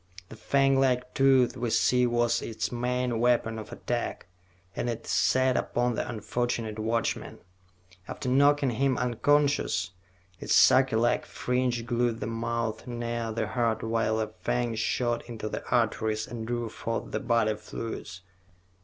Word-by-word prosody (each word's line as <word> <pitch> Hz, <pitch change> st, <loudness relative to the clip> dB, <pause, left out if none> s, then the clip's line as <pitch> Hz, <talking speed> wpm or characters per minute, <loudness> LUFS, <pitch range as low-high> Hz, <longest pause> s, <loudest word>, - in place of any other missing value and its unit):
The -, -, -10 dB
fanglike 135 Hz, 0 st, +2 dB
tooth 135 Hz, -2 st, +4 dB
we 120 Hz, -2 st, -2 dB
see 125 Hz, +2 st, +3 dB
was 120 Hz, 0 st, +1 dB
its 110 Hz, -, -3 dB
main 125 Hz, -1 st, -1 dB
weapon 115 Hz, -2 st, +1 dB
of 110 Hz, -, -9 dB
attack, 120 Hz, -1 st, -3 dB, 0.5 s
and 120 Hz, -, -2 dB
it 115 Hz, -, -4 dB
set 130 Hz, +4 st, +2 dB
upon 120 Hz, 0 st, 0 dB
the -, -, -3 dB
unfortunate 115 Hz, 0 st, -3 dB
watchman. 115 Hz, 0 st, -2 dB, 0.7 s
After -, -, -6 dB
knocking 140 Hz, +1 st, +4 dB
him 130 Hz, +2 st, +1 dB
unconscious, 125 Hz, -7 st, +1 dB, 0.5 s
its -, -, +1 dB
sucker 130 Hz, -3 st, +5 dB
like 120 Hz, +1 st, +1 dB
fringe 125 Hz, -2 st, -1 dB
glued 120 Hz, -1 st, 0 dB
the -, -, -3 dB
mouth 115 Hz, 0 st, -3 dB
near 120 Hz, -1 st, -3 dB
the 110 Hz, 0 st, -1 dB
heart 120 Hz, -2 st, 0 dB
while 115 Hz, -1 st, 0 dB
the 110 Hz, -1 st, -3 dB
fang 120 Hz, -1 st, -1 dB
shot 120 Hz, +2 st, -1 dB
into 110 Hz, -2 st, -5 dB
the -, -, -5 dB
arteries 110 Hz, 0 st, +1 dB
and 115 Hz, -2 st, -7 dB
drew 120 Hz, -1 st, -2 dB
forth 115 Hz, +1 st, -4 dB
the -, -, -1 dB
body 115 Hz, -2 st, +1 dB
fluids. 105 Hz, -4 st, -7 dB
120 Hz, 145 wpm, -28 LUFS, 115-125 Hz, 0.7 s, sucker